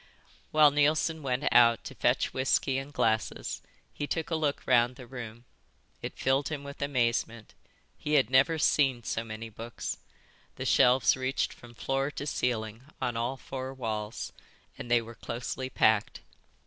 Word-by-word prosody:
While 155 -1 +6
Neilson 155 +2 +2
went 130 0 -1
out 115 -1 +6
to - - -7
fetch - - +1
whisky 130 0 +1
and 135 +2 -8
glasses 110 -5 -1 0.3
he 145 - -4
took 165 +2 -3
a - - +2
look 150 -3 -1
round 120 +1 +3
the 125 -1 -11
room. 120 -2 -8 0.6
It - - -6
filled 135 +1 +1
him 145 -2 -4
with 140 0 -9
amazement. 115 -5 -1 0.5
He 150 - -3
had 130 -5 +3
never 135 +5 +4
seen 135 -5 +2
so 115 - -2
many 115 0 -7
books. 115 +2 -6 0.6
The - - -5
shelves 125 +1 +5
reached 130 0 -1
from 120 -1 -15
floor 135 +3 -1
to 145 - -6
ceiling 115 -4 -2
on 120 - -1
all 120 +3 -1
four 130 0 -6
walls, 110 -3 -4 0.4
and 120 - -8
they 120 -1 +4
were 115 +1 -10
closely 125 +3 -5
packed. 110 -4 +2
130 Hz, 160 wpm, -29 LUFS, 115-140 Hz, 0.6 s, While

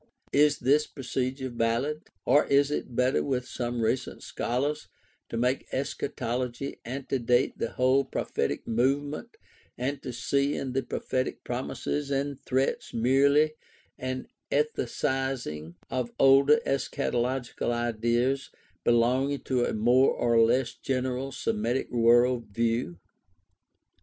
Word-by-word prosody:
Is 150 0 +4
this 145 +5 +3
procedure 130 0 -3
valid? 120 +6 -1 0.2
Or 145 - +4
is 140 +1 +3
it 130 -4 -3
better, 125 +2 +2
with 125 -2 -2
some 120 -1 -3
recent 120 +3 -1
scholars, 140 +5 -2 0.4
to 115 - -4
make 125 +3 0
eschatology 130 -1 -3
antedate 125 -1 0
the - - -2
whole 130 +2 +3
prophetic 70 - -2
movement 140 +6 -1 0.4
and 135 +3 -2
to 125 - -5
see 140 +4 0
in 130 -2 -3
the 135 - +1
prophetic 130 0 -3
promises 135 +3 -3
and 140 0 -1
threats 130 +1 -1
merely 140 +6 +4 0.5
an 130 0 -4 0.2
ethicizing 130 - -1 0.2
of 125 -2 -2
older 135 +2 +6
eschatological 125 -2 -1
ideas 120 +3 0 0.3
belonging 130 +4 +2
to 125 -2 0
a - - -1
more 120 +5 +4
or 115 -1 +3
less 120 +3 +2
general 130 0 -2
Semitic 120 +1 -1
world 120 0 +4
view 115 -3 -1
130 Hz, 115 wpm, -28 LUFS, 120-135 Hz, 0.5 s, older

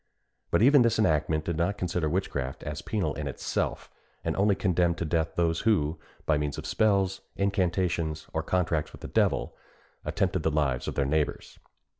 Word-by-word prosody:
But - - +3
even 140 +2 +7
this 115 -2 +3
enactment 80 -5 +2
did 85 -2 -2
not 90 +4 0
consider 90 -4 -1
witchcraft 70 -7 -2
as 75 0 -4
penal 95 -9 -1
in 75 0 -4
itself, 70 - -3 0.3
and - - -1
only 100 0 +3
condemned 90 -3 +1
to 85 - -2
death 80 0 0
those 85 -1 +1
who, 85 -8 +1 0.3
by 75 -2 +2
means 75 -1 -2
of - - -6
spells, 100 -3 +2
incantations, 90 -5 0
or 80 - 0
contracts 80 -2 0
with - - -12
the - - -6
devil, - - +1 0.5
attempted 95 -3 0
the 80 - +1
lives 70 -5 0
of - - -3
their 70 - +1
neighbours. 75 +1 -1
85 Hz, 175 wpm, -28 LUFS, 75-95 Hz, 0.5 s, even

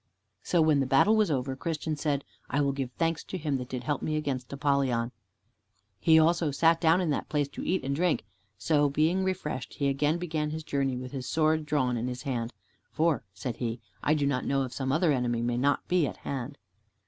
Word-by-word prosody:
So 170 -3 +2
when 155 -2 +4
the 135 - +1
battle 135 +12 +5
was 215 -3 +3
over, 135 -2 -1
Christian 155 +1 -3
said, 145 -2 -1 0.3
"I 145 - 0
will 140 -1 +2
give 135 -2 -3
thanks 165 +1 -1
to 185 - -5
Him 150 -5 -1
that 125 -1 -6
did 125 -1 -4
help 145 -3 -1
me 155 - -1
against 140 -5 -3
Apollyon." 135 -4 +1 0.9
He 160 - +5
also 165 0 +3
sat 165 +3 +3
down 165 +2 +4
in 170 -4 0
that - - -2
place 145 -2 +1
to - - -7
eat 185 -4 0
and 140 +1 -1
drink, 170 -7 +1 0.3
so 145 +2 +2
being 160 +6 +2
refreshed, 185 -8 -3
he 140 -1 +1
again 145 +4 +1
began 160 -3 -2
his 160 +1 -5
journey, 135 -3 -1
with 125 0 -6
his 130 -3 -5
sword 155 -1 +2
drawn 130 -5 +1
in 115 +2 -2
his 125 +1 -5
hand, 120 -4 -2 0.4
"For," 160 -4 +1
said 115 +5 -4
he, 115 -1 -3 0.2
"I 150 - +2
do 145 -2 +1
not 135 -2 0
know 135 0 +1
if 130 - -6
some 130 -1 -2
other 155 +2 +3
enemy 120 -3 0
may 120 0 0
not 145 +2 +1
be 175 -5 +2
at - - -6
hand." 135 +1 -5
145 Hz, 220 wpm, -28 LUFS, 130-160 Hz, 0.9 s, battle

